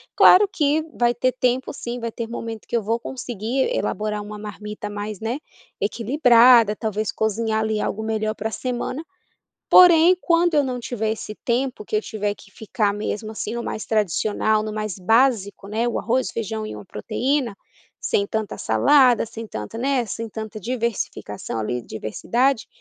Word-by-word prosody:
claro 405 +3 +7
que 300 +1 +1
vai 240 0 +2
ter 255 +1 0
tempo 255 +1 0
sim 240 +1 -5
vai 230 -1 -4
ter 230 0 -5
momento 225 -1 -6
que - - -3
eu 235 - +2
vou 225 +3 -1
conseguir 245 - -2
elaborar 210 0 -2
uma 210 0 -8
marmita 210 0 -7
mais 205 -1 -5
né, 225 +4 -2 0.4
equilibrada 235 0 +5
talvez 215 -1 -2
cozinhar 220 0 0
ali 220 -1 0
algo 210 - -2
melhor 220 -1 -1
para 220 0 -4
semana. 255 +5 -3 0.7
Porém, 350 0 +8
quando 340 0 +2
eu 295 -1 +4
não 255 -2 -3
tiver 220 -2 -2
esse 215 -1 -7
tempo 250 -1 -1
que - - -3
eu 210 - +2
tiver 205 -2 -3
que 205 - -18
ficar 210 -1 -1
mesmo 210 +1 -4
assim 220 +1 -4
no 235 - -3
mais 215 - -4
tradicional 215 +1 +1
no 215 0 -4
mais 215 -2 -3
básico 215 -1 +2
né, 225 +3 0
o 240 - -1
arroz 245 +4 0
o - - -10
feijão 220 -1 -3
e - - -7
uma - - -9
proteína, 245 +3 -1 0.4
sem 200 - 0
tanta 220 -1 -3
salada, 245 - +4
sem 225 0 -8
tanta 110 - -6
né, 260 0 +1
sem 230 +1 -5
tanta 220 0 -7
diversificação 225 - -3
ali 120 +3 -2
diversidade, 230 - -1
220 Hz, 170 wpm, -22 LUFS, 210-245 Hz, 0.7 s, Porém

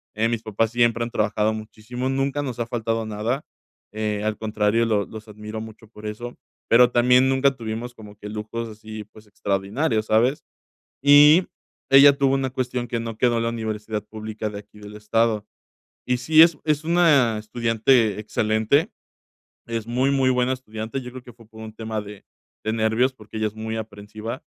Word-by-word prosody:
eh, 115 +1 +1
mis 115 -1 -2
papás 110 +1 -1
siempre 120 -1 +2
han 120 - -4
trabajado 105 0 0
muchísimo, 110 +3 -6
nunca 135 +2 -1
nos 125 -3 -5
ha 115 - -2
faltado 115 -1 -2
nada, 110 +6 -2 0.5
eh, 105 -1 -2
al 110 -1 -1
contrario, 110 +1 +1
los 105 -3 0
los 110 0 -10
admiro 105 +1 -8
mucho 110 0 -11
por 105 -1 -13
eso, 120 +3 -7 0.3
pero 120 +1 +6
también 125 +2 +4
nunca 135 0 +2
tuvimos 115 +2 -5
como 105 -1 -13
que 105 - -9
lujos 110 +2 -5
así, 110 0 -9
pues, 110 0 -16
extraordinarios, 105 +4 -1
¿sabes? 120 +6 +2 0.6
Y 150 +5 +7 0.4
ella 140 +1 +8
tuvo 135 -1 +2
una 135 -1 -1
cuestión 125 -1 -3
que 115 0 -2
no 115 -1 -6
quedó 120 -2 +2
en 115 - 0
la - - +1
universidad 110 -2 -4
pública 110 0 -5
de 100 -1 -7
aquí 105 +1 -19
del 105 0 -11
estado. 110 0 0 0.6
Y 125 0 +1
sí, 155 +6 +5
es 165 -2 +3
es 150 0 +1
una 155 -9 +3
estudiante 115 0 +1
excelente, 110 +6 +1 0.8
es 115 -1 -4
muy, 125 +3 +1
muy 135 -2 +2
buena 125 0 +1
estudiante, 110 0 -6
yo 125 - -8
creo 130 - -9
que 120 - -12
fue 115 -1 -19
por 110 0 -13
un 110 0 -9
tema 110 -1 -4
de 105 -1 -11 0.4
de 110 - -1
nervios, 110 +4 +1
porque 110 -2 -10
ella 110 - 0
es 105 - -14
muy 110 0 -4
aprensiva, 110 +3 -7
115 Hz, 185 wpm, -23 LUFS, 110-125 Hz, 0.8 s, ella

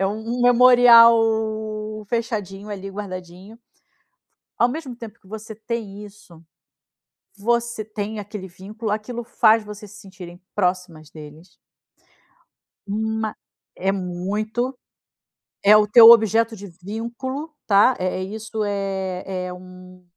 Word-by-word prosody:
é 195 - +2
um 220 +4 -4
memorial 245 -2 +7 0.9
fechadinho 215 -4 -4
ali 195 -1 -6
guardadinho. 190 +1 -9 1.0
Ao 240 - +3
mesmo 270 -3 -6
tempo 230 -1 -11
que 190 - -23
você 220 +1 -9
tem 215 -2 -6
isso, 185 -5 -17 1.0
você 235 +1 -1
tem 215 0 -5
aquele 205 -1 -8
vínculo, 205 +4 -7
aquilo 235 +3 -4
faz 225 -2 +3
você 210 0 -10
se 205 - -14
sentirem 185 -3 -12
próximas 180 -5 -2
deles. 155 +3 -14 1.3
Ma 220 +1 -3 0.4
é 195 +1 -1
muito, 210 +7 -3 0.9
é 210 +1 +7
o 210 0 +4
teu 230 +1 +9
objeto 225 0 +3
de 200 0 -10
vínculo 240 - -6
está, 210 +5 +4
é 185 0 -2
isso 220 +2 -5
é 195 -2 -3 0.2
é 180 - -6
um 185 0 -14
210 Hz, 115 wpm, -21 LUFS, 190-230 Hz, 1.3 s, teu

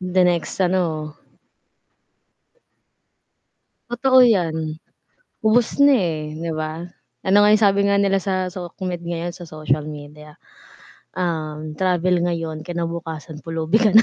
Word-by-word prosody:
The 185 0 +2
next, 175 +1 0
ano. 165 -5 0 2.8
Totoo 255 +2 +5
'yan. 160 -9 +1 0.7
Ubos 230 +4 +3
na, 285 0 +7
eh, 160 - -1
'di 165 +1 -4
ba? 155 +1 -4 0.4
Ano 190 +1 +3
nga 210 - +5
'yong 215 +1 +4
sabi 200 0 +4
nga 200 0 +3
nila 195 -1 +2
sa 185 -1 -1
socmed 180 0 -6
ngayon? 170 0 -4
Sa 175 -2 -9
social 155 -1 -1
media. 150 0 -10 0.8
Um, 155 -3 -3
travel 180 0 +1
ngayon, 165 -3 -2
kinabukasan 165 -2 -5
pulubi 165 +4 +1
ka 215 - +5
na. 225 - +9
170 Hz, 125 wpm, -21 LUFS, 155-190 Hz, 2.8 s, na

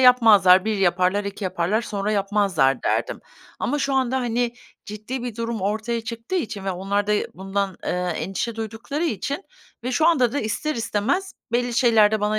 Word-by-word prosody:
yapmazlar. 215 -8 +7
1 220 -1 0
yaparlar, 185 +2 +2
2 200 0 -5
yaparlar, 185 +5 0
sonra 205 -1 -2
yapmazlar, 195 -9 +1
derdim. - - -1 0.4
Ama 290 +4 -1
şu 275 -1 0
anda, 260 -1 +1
hani, 240 0 0 0.3
ciddi 215 +5 -6
bir 240 -3 -5
durum 230 -2 -3
ortaya 215 +4 -1
çıktığı 230 +8 -6
için 215 - -2
ve 195 - -1
onlar 195 +3 -1
da, 210 - +2
ııı, 210 - +1
bundan, 195 0 -2
ııı, 180 0 -1
endişe 190 +8 -3
duydukları 225 +8 -4
için 280 - -2 0.4
ve 255 - -2
şu 315 +6 +3
anda 255 -8 +3
da 285 - -1
ister 230 +8 -2
istemez 240 - -1 0.2
belli 245 0 0
şeylerde 220 -4 +4
bana 210 +1 +1
215 Hz, 175 wpm, -23 LUFS, 200-245 Hz, 0.4 s, yapmazlar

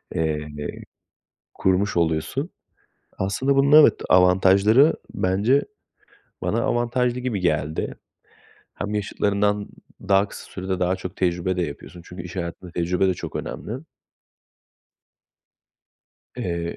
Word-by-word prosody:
eee, 75 -2 -1 1.1
kurmuş 95 +1 +1
oluyorsun. 85 - 0 0.7
Aslında 130 +9 0
bunun 140 +3 +7
evet, - - +6
avantajları 95 - +5 0.2
bence 100 +9 +2 0.8
bana - - 0
avantajlı 120 +1 0
gibi 120 -6 -2
geldi. 75 -3 -1 0.8
Hem 105 +1 -4
yaşıtlarından 105 0 0 0.3
daha 100 +1 +2
kısa - - -11
sürede 95 -1 -3
daha 90 +1 +1
çok 95 -1 -7
tecrübe 90 0 0
de 90 - 0
yapıyorsun 85 +3 -7
çünkü 90 -1 -8
iş 90 +2 -9
hayatında 85 0 -5
tecrübe 90 +3 +1
de 90 - +1
çok - - -6
önemli. 110 - -5 2.6
Eee, 85 -1 -3
95 Hz, 105 wpm, -23 LUFS, 85-105 Hz, 2.6 s, bunun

